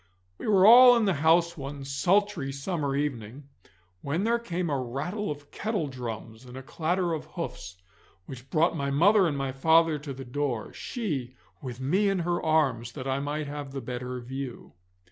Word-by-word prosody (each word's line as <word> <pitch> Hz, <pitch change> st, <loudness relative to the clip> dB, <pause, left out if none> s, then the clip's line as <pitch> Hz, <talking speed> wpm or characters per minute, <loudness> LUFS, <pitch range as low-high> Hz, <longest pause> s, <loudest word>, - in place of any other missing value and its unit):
We -, -, -6 dB
were 195 Hz, -3 st, +5 dB
all 245 Hz, +3 st, +9 dB
in 230 Hz, -, +2 dB
the 195 Hz, -, +2 dB
house 170 Hz, +2 st, +4 dB
one 140 Hz, -2 st, -7 dB
sultry 175 Hz, +2 st, +1 dB
summer 140 Hz, 0 st, -2 dB
evening, 135 Hz, -1 st, -4 dB, 0.5 s
when 160 Hz, +7 st, -2 dB
there 235 Hz, +2 st, +2 dB
came 180 Hz, -6 st, -3 dB
a 140 Hz, -2 st, 0 dB
rattle 175 Hz, -, -4 dB
of 145 Hz, -1 st, -7 dB
kettledrums 125 Hz, -, -4 dB
and 125 Hz, 0 st, -11 dB
a 135 Hz, -, -8 dB
clatter 170 Hz, +5 st, -1 dB
of 155 Hz, -, -4 dB
hoofs, 90 Hz, +1 st, -7 dB, 0.5 s
which 130 Hz, 0 st, -10 dB
brought 165 Hz, +3 st, +2 dB
my 140 Hz, -2 st, -2 dB
mother 190 Hz, +7 st, +4 dB
and 145 Hz, -3 st, -2 dB
my 135 Hz, -1 st, -2 dB
father 160 Hz, +3 st, +3 dB
to 145 Hz, -1 st, -7 dB
the 135 Hz, 0 st, -8 dB
door, 125 Hz, -2 st, -3 dB
she 140 Hz, -, -4 dB, 0.3 s
with 125 Hz, -3 st, -7 dB
me 185 Hz, +10 st, +1 dB
in 195 Hz, -, 0 dB
her 175 Hz, 0 st, -1 dB
arms 135 Hz, -7 st, +1 dB
that 135 Hz, -2 st, -6 dB
I 135 Hz, 0 st, 0 dB
might 145 Hz, +2 st, -3 dB
have 145 Hz, -1 st, -7 dB
the 135 Hz, -, -3 dB
better 125 Hz, 0 st, -5 dB
view. 130 Hz, 0 st, -7 dB
145 Hz, 180 wpm, -27 LUFS, 130-175 Hz, 0.5 s, all